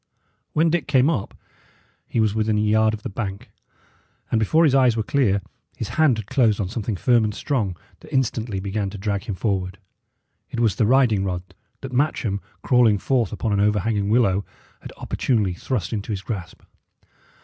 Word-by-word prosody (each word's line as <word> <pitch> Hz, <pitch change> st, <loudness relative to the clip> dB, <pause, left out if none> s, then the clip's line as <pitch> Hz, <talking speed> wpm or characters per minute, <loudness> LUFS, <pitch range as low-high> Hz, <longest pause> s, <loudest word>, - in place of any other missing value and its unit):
When 160 Hz, +1 st, +3 dB
Dick 170 Hz, -4 st, 0 dB
came 140 Hz, +2 st, +4 dB
up, 115 Hz, -12 st, -4 dB, 0.7 s
he -, -, -1 dB
was 110 Hz, -2 st, +2 dB
within 110 Hz, -1 st, +1 dB
a -, -, +2 dB
yard 110 Hz, +1 st, +3 dB
of 105 Hz, -, -13 dB
the -, -, -3 dB
bank; 100 Hz, -2 st, -5 dB, 0.8 s
and 115 Hz, -, +2 dB
before 155 Hz, +10 st, +3 dB
his 150 Hz, -5 st, +4 dB
eyes 130 Hz, -4 st, +4 dB
were 110 Hz, -, 0 dB
clear, 105 Hz, -7 st, +1 dB, 0.3 s
his -, -, -4 dB
hand 155 Hz, -7 st, +3 dB
had 110 Hz, -, -5 dB
closed 110 Hz, -2 st, +2 dB
on 95 Hz, -4 st, -2 dB
something 110 Hz, 0 st, -3 dB
firm 120 Hz, +4 st, +3 dB
and 105 Hz, -1 st, -2 dB
strong 105 Hz, -, -1 dB, 0.2 s
that -, -, -15 dB
instantly 115 Hz, -5 st, -1 dB
began 100 Hz, +1 st, -2 dB
to 100 Hz, -, -8 dB
drag 100 Hz, 0 st, -2 dB
him 100 Hz, -, -3 dB
forward. 95 Hz, -2 st, -2 dB, 0.7 s
It 120 Hz, -, -5 dB
was 110 Hz, -5 st, +2 dB
the 110 Hz, -, +2 dB
riding 120 Hz, -6 st, +3 dB
rod, 90 Hz, -2 st, -2 dB, 0.4 s
that 130 Hz, -1 st, -7 dB
Matcham, 120 Hz, -7 st, 0 dB, 0.2 s
crawling 120 Hz, -5 st, +4 dB
forth 120 Hz, +3 st, 0 dB
upon 110 Hz, -3 st, -2 dB
an 100 Hz, -, +1 dB
overhanging 105 Hz, 0 st, +1 dB
willow, 100 Hz, -4 st, +3 dB, 0.4 s
had -, -, -10 dB
opportunely 105 Hz, -8 st, 0 dB
thrust 100 Hz, 0 st, -3 dB
into 105 Hz, 0 st, -3 dB
his 100 Hz, -2 st, -3 dB
grasp. 95 Hz, -7 st, -6 dB
110 Hz, 180 wpm, -23 LUFS, 100-125 Hz, 0.8 s, came